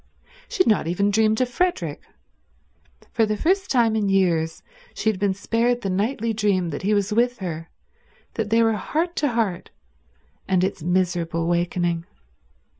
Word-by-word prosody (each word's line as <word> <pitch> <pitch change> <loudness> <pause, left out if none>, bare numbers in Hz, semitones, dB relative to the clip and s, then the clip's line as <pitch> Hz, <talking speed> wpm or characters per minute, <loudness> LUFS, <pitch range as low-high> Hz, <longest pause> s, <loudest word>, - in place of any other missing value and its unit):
She 370 - +2
had - - -6
not 215 -7 +2
even 200 +4 +1
dreamed 220 +2 +2
of 250 - +1
Frederick. 245 - -1 1.1
For 225 - +2
the 210 0 -1
first 380 - +1
time 230 -4 +3
in 210 -2 0
years 170 -4 +1 0.3
she 220 - +1
had 195 - -8
been 200 -1 +1
spared 235 +4 0
the 195 - -2
nightly 225 +4 -1
dream 200 -5 0
that 145 - -5
he 210 +2 +1
was 205 +1 0
with 245 +2 +2
her, 165 -3 -6 0.6
that 220 -4 -3
they 230 +1 +4
were 225 0 +3
heart 320 - -2
to 295 - +2
heart, 215 -7 -1 0.8
and 185 -1 +2
its 190 -3 -2
miserable 175 -1 0
awakening. 175 0 -1
205 Hz, 165 wpm, -23 LUFS, 175-230 Hz, 1.1 s, they